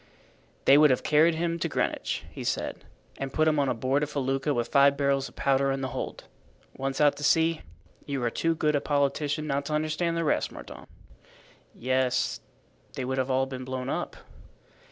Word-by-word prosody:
"They 140 +2 +7
would 150 0 +7
have 130 - +1
carried 160 +2 +4
him 170 +1 -1
to - - -1
Greenwich," - - -2
he - - -7
said, - - -3 0.3
"and 135 -1 -4
put 155 +2 +2
him 155 -1 +3
on 135 -4 0
board 130 +4 +1
a 150 - 0
felucca 135 0 -1
with 120 -3 -1
five 140 0 +5
barrels 140 -1 +1
of - - -22
powder 135 0 +2
in 135 0 -2
the 130 - -2
hold. 130 - -5 0.5
Once 135 0 -3
out 145 -1 +4
to 145 - -7
sea, 165 +1 +3 0.5
you 140 -3 -2
are 120 - 0
too 165 +5 0
good 150 -1 +1
a 145 - +1
politician 145 +1 0
not 140 -1 -1
to 150 - -3
understand 155 +2 -1
the 165 - 0
rest, 150 - 0
Mordaunt." - - -11 0.9
"Yes, 130 0 0 0.5
they 130 - -4
would 130 +1 -2
have 130 0 -1
all 130 0 +2
been 130 -1 -7
blown 130 0 -4
up." - - -3
140 Hz, 195 wpm, -27 LUFS, 130-150 Hz, 0.9 s, They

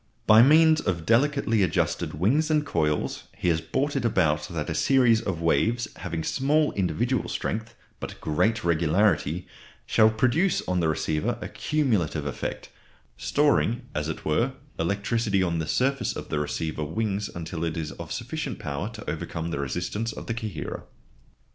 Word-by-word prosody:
By 110 +1 +8
means 155 +4 +6
of 85 -4 -2
delicately 120 -2 +2
adjusted 90 -4 0
"wings" 130 - +2
and 150 -1 +2
coils 75 - -1
he 90 - 0
has 80 -1 +1
brought 135 - -1
it 135 - 0
about 80 -9 +1
that 80 -4 -4
a 80 - -2
series 125 - +4
of 85 -4 -3
waves 115 +7 +2
having 80 0 -4
small 145 - +2
individual 100 +6 -1
strength, 110 +1 -3 0.2
but - - -7
great 110 +9 +1
regularity, 85 0 +2 0.4
shall 110 -1 +5
produce 130 - +1
on 90 0 +1
the 85 - +2
receiver 75 0 -1
a - - -5
cumulative 105 - 0
effect, 70 - -4 0.5
storing, 140 -4 +1
as 75 +1 -2
it 80 - -6
were, 115 - +1 0.3
electricity 100 +3 0
on 85 -2 0
the 80 - -3
surface 135 - 0
of - - -7
the 75 - -1
receiver 75 +1 -2
"wings" 100 +6 -2
until 85 0 -4
it 80 0 -2
is 80 -2 -3
of - - -9
sufficient - - -4
power 70 +8 -4
to 110 - -10
overcome 80 +1 -4
the 70 - -2
resistance 90 - -2
of - - -8
the 115 - -2
coherer. 110 -8 -5
100 Hz, 160 wpm, -26 LUFS, 80-120 Hz, 0.5 s, By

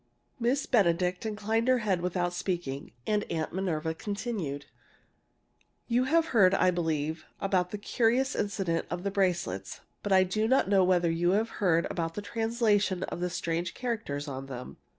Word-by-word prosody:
Miss 250 +4 +1
Benedict 180 -2 +2
inclined 220 +2 -1
her 255 0 +5
head 190 -4 +1
without 175 0 -1
speaking, 175 -6 -3
and 210 -1 +1
Aunt 160 -1 -2
Minerva 165 -4 -1
continued: 195 - -4 1.2
"You 245 +2 +2
have 325 +3 +2
heard, 195 -5 +5
I 185 - +4
believe, 160 -2 -1 0.2
about 185 -2 +1
the 210 - -4
curious 240 +5 +1
incident 195 -5 -1
of 175 0 -4
the 200 - -1
bracelets, 175 - -1 0.2
but 205 - -4
I 190 -1 +6
do 215 +4 0
not 260 -2 +3
know 195 -1 +4
whether 175 -2 +3
you 175 +2 +2
have 220 +3 +1
heard 170 -4 +3
about 165 -1 -3
the 205 - -4
translation 210 -2 +1
of - - -4
the 180 0 -1
strange 170 0 -2
characters 215 - -3
on 135 -1 -5
them." 125 -2 -8
185 Hz, 165 wpm, -29 LUFS, 170-215 Hz, 1.2 s, I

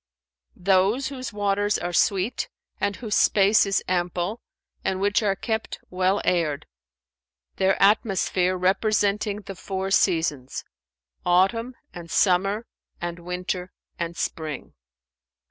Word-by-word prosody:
"Those 195 +8 +2
whose 255 -2 -6
waters 205 0 +1
are 175 0 -4
sweet 195 +5 +1 0.3
and 200 0 0
whose 220 -4 -5
space 205 0 +4
is 195 - +1
ample 180 +4 -1 0.4
and 190 0 -1
which 205 +2 +2
are 200 -2 +1
kept 220 +2 -3
well 185 +2 +1
aired; 160 -5 +1 0.9
their 190 0 +2
atmosphere 195 -3 +2
representing 205 +2 +1
the 195 - -7
four 190 +1 -4
seasons—autumn 165 - 0 0.2
and 170 -1 -9
summer 195 +5 +2 0.3
and 175 0 -4
winter 180 +1 -4 0.3
and 170 0 -3
spring." 155 -4 -4
190 Hz, 110 wpm, -25 LUFS, 175-205 Hz, 0.9 s, space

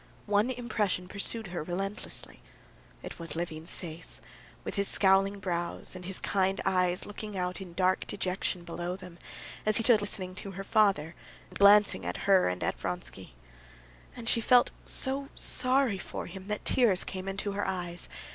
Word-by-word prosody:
One 210 +3 +2
impression 215 -7 -1
pursued 200 +2 0
her 175 - -2
relentlessly. 195 +6 -5 0.6
It - - -8
was 165 -3 -4
Levin's 165 -1 -4
face, 165 -2 -7 0.4
with - - -4
his 200 -1 +2
scowling 195 +1 +4
brows, 175 -2 -3
and 180 -1 -8
his 190 +1 -2
kind 190 0 0
eyes 180 -1 +1
looking 205 -1 -6
out 180 +1 -2
in 180 -3 -9
dark 185 +1 +2
dejection 185 -2 -2
below 175 +1 -4
them, 180 -2 -12 0.4
as 215 0 +4
he 230 - +1
stood 225 -3 +6
listening 190 -3 0
to 195 -1 -6
her 195 +2 -5
father, 195 -7 +2 0.4
and - - -8
glancing 205 +1 +6
at - - -4
her 195 - +5
and 90 0 -3
at - - -1
Vronsky. 60 - -5 0.8
And 235 -1 -8
she 230 - +3
felt 245 +2 +5
so 275 +1 -1
sorry 255 -5 +2
for - - -6
him 190 +2 -9
that 210 0 -3
tears 220 -8 +3
came 185 0 -6
into 195 +1 -2
her 200 +1 -2
eyes. 175 -2 -4
195 Hz, 165 wpm, -30 LUFS, 180-210 Hz, 0.8 s, stood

